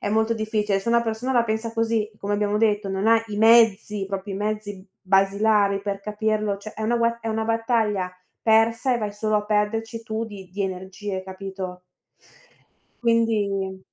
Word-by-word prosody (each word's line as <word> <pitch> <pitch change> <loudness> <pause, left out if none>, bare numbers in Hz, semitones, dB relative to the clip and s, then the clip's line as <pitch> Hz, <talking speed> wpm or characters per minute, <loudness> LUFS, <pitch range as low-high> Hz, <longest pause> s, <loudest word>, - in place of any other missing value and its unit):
è - - -2
molto 220 +1 +2
difficile, 215 -2 0
se 195 - -5
una 235 0 +4
persona 230 +3 -2
la 240 -2 +4
pensa 220 0 -2
così, 225 -2 0
come 200 +1 -3
abbiamo 205 0 +1
detto, 210 -2 +1
non 195 +2 -1
ha 230 0 +6
i 210 -2 -6
mezzi, 220 -3 +4
proprio 195 0 -4
i - - -4
mezzi 210 0 -3
b 190 - -19 0.2
basilari 200 +1 +3
per 200 -1 -3
capirlo, 210 0 -1
cioè 210 +2 -9
è 220 - -6
una 235 +2 +1
gue 235 0 +1
è 225 - -4
una 220 0 -1
battaglia 225 -4 0 0.3
persa 230 +3 +3
e - - 0
vai 210 -2 -3
solo 215 +1 0
a 210 - -1
perderci 220 +2 -1
tu 220 0 -3
di 200 -4 -10
di 200 +1 -2
energie, 190 +1 -4
capito? 190 -1 -7 1.2
Quindi 205 -5 +1
210 Hz, 180 wpm, -24 LUFS, 200-225 Hz, 1.2 s, ha